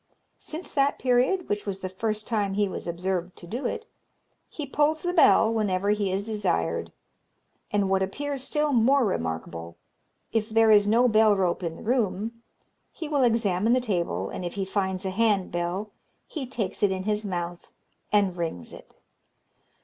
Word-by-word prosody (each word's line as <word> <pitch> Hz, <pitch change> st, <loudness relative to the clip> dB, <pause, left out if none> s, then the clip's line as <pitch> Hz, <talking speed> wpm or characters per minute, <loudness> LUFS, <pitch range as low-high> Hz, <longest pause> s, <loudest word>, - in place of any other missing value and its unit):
Since 320 Hz, +3 st, -8 dB
that 280 Hz, 0 st, +2 dB
period, 260 Hz, +9 st, +2 dB
which 205 Hz, 0 st, -2 dB
was 195 Hz, -1 st, -3 dB
the 185 Hz, -, -3 dB
first 215 Hz, +3 st, -2 dB
time 205 Hz, -4 st, -1 dB
he 205 Hz, 0 st, +2 dB
was 185 Hz, -, -6 dB
observed 180 Hz, +1 st, -2 dB
to -, -, -10 dB
do 240 Hz, +8 st, -3 dB
it, 455 Hz, -, -4 dB, 0.6 s
he 300 Hz, -, -5 dB
pulls 300 Hz, +3 st, +1 dB
the 355 Hz, 0 st, -1 dB
bell 230 Hz, -9 st, +5 dB
whenever 200 Hz, -2 st, +1 dB
he 205 Hz, -2 st, 0 dB
is 195 Hz, +2 st, -1 dB
desired; 180 Hz, -, -1 dB, 0.8 s
and 205 Hz, -1 st, +1 dB
what 190 Hz, 0 st, +2 dB
appears 275 Hz, +8 st, -3 dB
still 300 Hz, +1 st, 0 dB
more 255 Hz, +3 st, +4 dB
remarkable, 80 Hz, -, -4 dB, 0.5 s
if 225 Hz, -1 st, 0 dB
there 225 Hz, 0 st, +4 dB
is 205 Hz, -1 st, +6 dB
no 235 Hz, +4 st, +4 dB
bell 215 Hz, -2 st, +5 dB
rope 185 Hz, -2 st, 0 dB
in 165 Hz, -2 st, -3 dB
the -, -, -11 dB
room, 225 Hz, -1 st, -1 dB, 0.5 s
he 320 Hz, -, -6 dB
will 290 Hz, -2 st, +1 dB
examine 225 Hz, -3 st, +2 dB
the 255 Hz, -, +4 dB
table, 170 Hz, -, -1 dB
and -, -, -5 dB
if 175 Hz, -, -5 dB
he 195 Hz, -1 st, -1 dB
finds 190 Hz, -1 st, -2 dB
a 190 Hz, -, -1 dB
hand 205 Hz, -2 st, +1 dB
bell, 175 Hz, +5 st, -2 dB, 0.3 s
he 285 Hz, -6 st, -6 dB
takes 215 Hz, -7 st, -4 dB
it 205 Hz, -2 st, +4 dB
in 185 Hz, 0 st, -2 dB
his 210 Hz, +1 st, 0 dB
mouth 175 Hz, -3 st, -4 dB, 0.4 s
and 200 Hz, -4 st, +2 dB
rings 160 Hz, -, -4 dB
it. -, -, -14 dB
205 Hz, 175 wpm, -26 LUFS, 185-240 Hz, 0.8 s, is